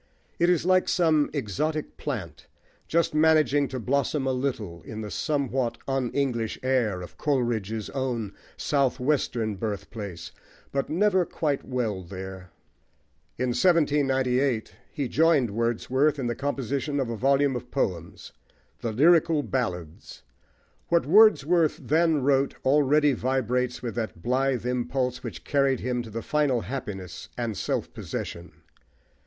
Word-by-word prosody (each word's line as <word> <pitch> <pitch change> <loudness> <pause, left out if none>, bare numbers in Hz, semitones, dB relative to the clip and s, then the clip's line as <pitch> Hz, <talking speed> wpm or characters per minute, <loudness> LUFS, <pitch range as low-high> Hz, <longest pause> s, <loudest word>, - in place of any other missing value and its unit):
It 175 - +4
is 175 -2 +2
like 185 0 +3
some 160 -4 +3
exotic 150 - -2
plant, 115 - -5 0.4
just 170 -1 +1
managing 155 -3 +4
to 130 - -5
blossom 140 +3 0
a 135 - +1
little 115 -10 -3
in 110 +4 -7
the 105 -1 -6
somewhat 135 -5 -1
un 135 -2 0
english 120 -5 -1
air 120 -8 +1
of 90 - -12
Coleridge's 115 -7 -1
own 120 -7 -2 0.2
south 140 -3 +1
western 125 -6 0
birthplace, 100 -4 -5 0.4
but 135 -1 -1
never 185 +2 +3
quite 150 -4 -2
well 115 -7 -2
there. 95 0 -8 0.9
In 125 +1 0
1798 135 -4 +2 0.2
he 140 -4 -2
joined 150 -6 +3
Wordsworth 125 +6 +1
in 135 - -3
the 120 - 0
composition 140 +2 -2
of 125 -4 -1
a - - -2
volume 135 +3 +2
of 125 0 -6
poems 85 - -3 0.5
the 115 - -3
Lyrical 160 +4 +4
Ballads. 90 - -4 0.6
What 170 0 +2
Wordsworth 175 -3 +5
then 160 -2 +2
wrote 135 0 +2
already 145 +1 +4
vibrates 125 -1 -1
with 120 - -3
that 95 -7 -4
blithe 130 -1 0
impulse 125 +1 -1
which 95 -11 -7
carried 140 - +1
him 125 0 -1
to 115 -1 -6
final 145 -5 +1
happiness 95 -5 -6
and 115 -3 -2
self - - -2
possession. 85 +1 -6
130 Hz, 130 wpm, -26 LUFS, 115-145 Hz, 0.9 s, Wordsworth